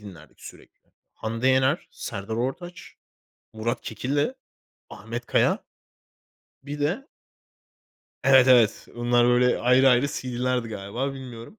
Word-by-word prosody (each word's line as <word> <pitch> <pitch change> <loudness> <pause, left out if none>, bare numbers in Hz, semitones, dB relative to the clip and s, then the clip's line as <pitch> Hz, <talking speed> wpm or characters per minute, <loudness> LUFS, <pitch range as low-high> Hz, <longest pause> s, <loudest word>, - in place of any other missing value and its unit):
dinlerdik 90 -7 -14
sürekli; - - -14 0.3
Hande 115 +4 -2
Yener, 130 +5 +2
Serdar 100 0 -6
Ortaç, 165 +9 -5 0.6
Murat 115 +2 -3
Kekilli, 145 - -2 0.6
Ahmet 120 +4 -7
Kaya. - - +1 1.0
Bir 145 +1 -7
de 195 - -2 1.2
Evet, 130 -2 +6
evet. 120 -5 +4
Bunlar 120 0 +2
böyle 125 0 +3
ayrı 125 +2 +4
ayrı 125 +2 +4
CD'lerdi 125 -2 -2
galiba, 110 +6 -4
bilmiyorum. 125 - -10
125 Hz, 110 wpm, -25 LUFS, 115-135 Hz, 1.2 s, Evet